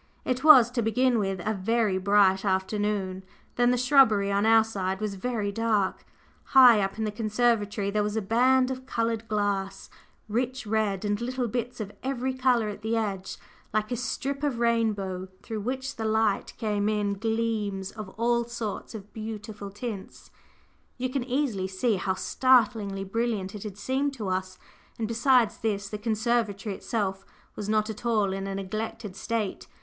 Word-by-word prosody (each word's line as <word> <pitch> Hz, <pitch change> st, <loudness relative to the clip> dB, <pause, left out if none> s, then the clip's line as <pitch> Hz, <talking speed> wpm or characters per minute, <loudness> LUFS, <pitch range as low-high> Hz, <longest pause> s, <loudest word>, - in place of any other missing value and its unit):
It 255 Hz, +1 st, -1 dB
was, 260 Hz, -7 st, +8 dB
to 245 Hz, -1 st, 0 dB
begin 245 Hz, +2 st, +2 dB
with, 195 Hz, -3 st, -2 dB
a 215 Hz, -, +2 dB
very 210 Hz, -1 st, +1 dB
bright 195 Hz, 0 st, +4 dB
afternoon; 190 Hz, -1 st, -1 dB, 0.3 s
then 245 Hz, 0 st, +3 dB
the 250 Hz, -, +2 dB
shrubbery 245 Hz, -6 st, +4 dB
on 200 Hz, +2 st, +2 dB
our 225 Hz, 0 st, +6 dB
side 190 Hz, -3 st, -3 dB
was 215 Hz, -2 st, -2 dB
very 210 Hz, 0 st, -2 dB
dark; 215 Hz, -3 st, 0 dB, 0.5 s
high 245 Hz, -5 st, +9 dB
up 195 Hz, +1 st, -2 dB
in 220 Hz, -, -2 dB
the 215 Hz, -, -1 dB
conservatory 210 Hz, -2 st, 0 dB
there 210 Hz, +1 st, +1 dB
was 210 Hz, +1 st, -2 dB
a 220 Hz, -, 0 dB
band 255 Hz, +5 st, +3 dB
of 260 Hz, 0 st, -6 dB
coloured 230 Hz, -2 st, -1 dB
glass, 200 Hz, -2 st, -2 dB, 0.4 s
rich 250 Hz, +4 st, -2 dB
red, 210 Hz, -2 st, 0 dB
and 205 Hz, +1 st, -1 dB
little 250 Hz, 0 st, -2 dB
bits 240 Hz, +2 st, -3 dB
of 205 Hz, -2 st, -4 dB
every 260 Hz, -1 st, -2 dB
colour 255 Hz, -4 st, +2 dB
at 210 Hz, 0 st, -6 dB
the 220 Hz, +1 st, 0 dB
edge, 195 Hz, -4 st, -3 dB, 0.4 s
like 215 Hz, +2 st, 0 dB
a -, -, +1 dB
strip 270 Hz, +3 st, -3 dB
of 285 Hz, -5 st, -1 dB
rainbow, 210 Hz, -6 st, 0 dB, 0.2 s
through 220 Hz, -1 st, -4 dB
which 260 Hz, +5 st, -4 dB
the 220 Hz, -, -3 dB
light 220 Hz, -2 st, +1 dB
came 210 Hz, -1 st, 0 dB
in 210 Hz, -1 st, 0 dB
gleams 215 Hz, -2 st, -2 dB
of 215 Hz, -3 st, -8 dB
all 235 Hz, +1 st, +2 dB
sorts 230 Hz, -2 st, -5 dB
of 205 Hz, -1 st, -10 dB
beautiful 215 Hz, -2 st, -6 dB
tints. 205 Hz, -1 st, -7 dB, 0.7 s
You 255 Hz, 0 st, -2 dB
can 270 Hz, -2 st, -1 dB
easily 245 Hz, -7 st, -1 dB
see 195 Hz, +3 st, 0 dB
how 190 Hz, 0 st, -1 dB
startlingly 220 Hz, -5 st, +2 dB
brilliant 205 Hz, -1 st, -2 dB
it 210 Hz, -, -7 dB
had 205 Hz, -2 st, -7 dB
seemed 270 Hz, +5 st, -1 dB
to 210 Hz, -6 st, -4 dB
us; 185 Hz, 0 st, -2 dB, 0.4 s
and 225 Hz, -, -2 dB
besides 235 Hz, 0 st, +3 dB
this, 205 Hz, -3 st, -2 dB
the 210 Hz, -, -5 dB
conservatory 220 Hz, -2 st, 0 dB
itself 195 Hz, -2 st, -3 dB, 0.3 s
was 205 Hz, 0 st, -5 dB
not 215 Hz, 0 st, +2 dB
at 220 Hz, +3 st, -10 dB
all 215 Hz, -5 st, +1 dB
in 195 Hz, 0 st, -4 dB
a 195 Hz, -, -3 dB
neglected 215 Hz, +1 st, -5 dB
state. 220 Hz, -2 st, -3 dB
215 Hz, 170 wpm, -27 LUFS, 200-240 Hz, 0.7 s, high